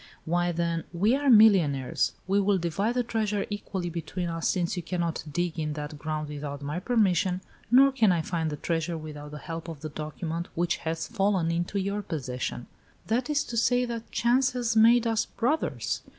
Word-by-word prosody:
"Why, 175 +1 +1
then, 170 -1 -1
we 200 +8 +2
are 285 0 +1
millionaires. 190 - +5
We 195 +2 +2
will 200 0 +3
divide 195 +7 -1
the 250 - +2
treasure 215 -3 -1
equally 190 -4 -4
between 170 +2 -4
us, 165 0 -2
since 185 0 0
you 175 - -3
cannot 170 -1 -2
dig 175 +1 -1
in 150 -1 -2
that 150 0 -6
ground 155 -1 -3
without 145 -1 -6
my 150 +4 -3
permission, 185 -4 +2 0.3
nor 270 +4 +7
can 225 -7 +3
I 170 -2 +1
find 165 -2 -1
the 150 - -3
treasure 165 +1 -2
without 150 -1 -8
the 150 - -8
help 165 +2 -6
of 160 -4 -7
the 155 - -5
document 160 +3 -4
which 170 0 +1
has 160 0 -3
fallen 195 -6 +1
into 175 +4 -1
your 200 +2 -1
possession. 130 -8 -4 0.4
That 245 +6 0
is 295 -1 +2
to 240 - -7
say, 245 +2 +3
that 235 -1 -6
chance 255 +3 +2
has 240 -2 -1
made 230 +2 +6
us 225 -1 +1
brothers. 290 +7 -1
175 Hz, 190 wpm, -27 LUFS, 160-220 Hz, 0.4 s, nor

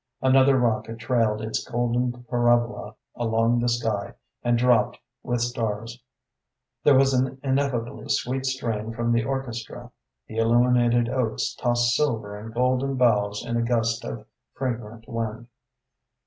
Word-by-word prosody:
Another 130 +1 +5
rocket 115 -2 0
trailed 110 -2 0
its 110 - -2
golden 120 +1 -1
parabola 120 -1 +1 0.2
along 115 0 +1
the 120 0 +1
sky, 115 -4 -2 0.3
and 120 0 +2
dropped 125 -1 +3 0.2
with 120 -1 -2
stars; 115 0 -3 0.8
there 145 - +6
was 135 0 +4
an 130 +1 0
ineffably 135 -3 -1
sweet 130 +2 -1
strain 115 -4 -2
from 120 +1 -1
the 115 -1 +2
orchestra; 120 -3 -5 0.3
the 110 - -9
illuminated 120 +1 +3
oaks 125 -3 -1
tossed 120 -1 +1
silver 115 -8 -1
and 110 +2 -8
golden 130 +3 +1
boughs 105 -4 +2
in 120 -1 -1
a - - +1
gust 115 -1 0
of 110 -2 -6 0.3
fragrant 115 -3 -4
wind. 115 -1 -4
120 Hz, 135 wpm, -25 LUFS, 115-125 Hz, 0.8 s, there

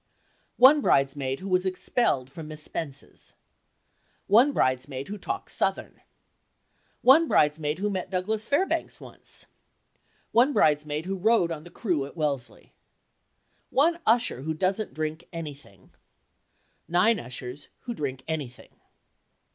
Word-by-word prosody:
1 280 +4 +7
bridesmaid 135 - +1
who 190 - -6
was 185 -1 +2
expelled 185 - 0
from 150 +3 -9
Miss 155 0 -6
Spence's. 140 -4 -6 0.9
1 240 +8 +5
bridesmaid 130 - -1
who 210 - -5
talks - - -4
"Southern." - - -2 1.0
1 305 +6 +7
bridesmaid 150 - +2
who 205 +3 -1
met 190 -3 -3
Douglas 210 +4 -2
Fairbanks 360 +7 0
once. - - -10 0.9
1 250 +5 +4
bridesmaid 150 - +2
who 190 0 -3
rowed 215 -4 +3
on 155 -1 -6
the - - -11
crew 175 - -1
at 145 - -15
Wellesley. 140 -5 -3 1.0
1 335 +5 +2
usher 230 - +2
who 160 +3 -3
doesn't 190 +5 -1
drink 155 +1 -4
anything. 145 - -9 1.0
9 185 +6 +3
ushers 125 +1 -7
who 245 - -5
drink 135 - -4
anything. 145 -6 -5
165 Hz, 125 wpm, -26 LUFS, 145-215 Hz, 1.0 s, 1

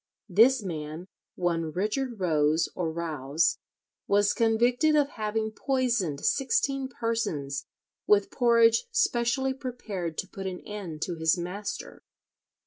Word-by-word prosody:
This 230 +6 +5
man, 160 -1 -5 0.3
one 165 -3 -1
Richard 215 - -2
Rose 155 -2 +2
or 170 -3 -2
Rouse, 160 -1 0 0.5
was 205 0 +3
convicted 240 +7 +3
of 290 -2 +3
having 220 -1 -2
poisoned 235 - -1
sixteen 270 0 +1
persons 195 - -2 0.4
with 205 -1 +4
porridge 230 - +4
specially 265 - +1
prepared 220 - -5
to 190 - -3
put 195 0 -6
an 180 -1 -5
end 185 -7 -6
to 175 -2 -4
his 160 +2 +2
master. 185 +4 -5
205 Hz, 120 wpm, -27 LUFS, 165-240 Hz, 0.5 s, This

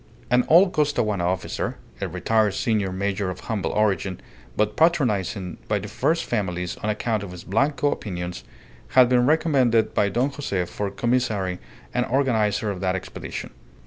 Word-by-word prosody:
An 125 0 +4
old 180 +4 +6
Costaguana 115 -11 +1
officer, 95 +1 -2 0.2
a - - -1
retired 110 -3 +1
senior 105 -5 0
major 100 0 -1
of 90 - -6
humble 110 -5 -2
origin, 100 -3 0 0.4
but 105 0 +1
patronized 130 - +2 0.3
by 105 - +1
the 100 +1 -5
first 165 +10 0
families 90 -6 -2
on 105 - -3
account 110 0 -1
of 100 - -6
his 90 -1 -9
Blanco 140 +7 +1
opinions, 90 -3 -5 0.5
had 125 -1 +8
been 125 -1 +4
recommended 135 -8 +3
by 100 - +2
Don 125 +7 0
Jose 100 -11 -2
for 100 +3 -3
commissary 105 -4 0 0.3
and 125 - +2
organizer 110 -6 +1
of 95 - -6
that 95 -1 +1
expedition. 95 - -6
105 Hz, 155 wpm, -24 LUFS, 95-125 Hz, 0.5 s, had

